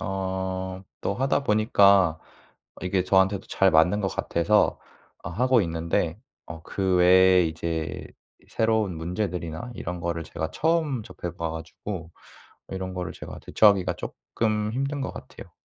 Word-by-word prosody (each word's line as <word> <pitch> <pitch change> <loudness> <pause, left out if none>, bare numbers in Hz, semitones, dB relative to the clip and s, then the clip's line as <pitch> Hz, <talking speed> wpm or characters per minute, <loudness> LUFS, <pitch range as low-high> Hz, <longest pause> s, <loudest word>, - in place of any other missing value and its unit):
어 95 -1 -3 0.2
또 - - -1
하다 135 +4 0
보니까 100 - +4 0.6
이게 90 0 0
저한테도 95 +1 +2
잘 95 0 +3
맞는 90 +6 +4
것 95 - 0
같아서 100 +4 +1 0.4
어 - - -4
하고 125 +6 +3
있는데 85 0 -1 0.3
어 80 -1 -9
그 95 +1 0
외에 90 0 +6
이제 80 0 -4 0.4
새로운 110 -5 0
문제들이나 90 +3 -4
이런 90 -3 -5
거를 85 -1 -3
제가 80 0 -4
처음 160 -7 0
접해 85 -3 -7
봐 85 -1 -2
가지고 80 +2 -7 0.6
이런 95 -1 -5
거를 90 -1 -4
제가 - - -9
대처하기가 100 -4 +3
쪼끔 110 -1 -2
힘든 140 +3 -2
것 130 - -3
같아요. - - -11
95 Hz, 280 characters per minute, -25 LUFS, 85-105 Hz, 0.6 s, 외에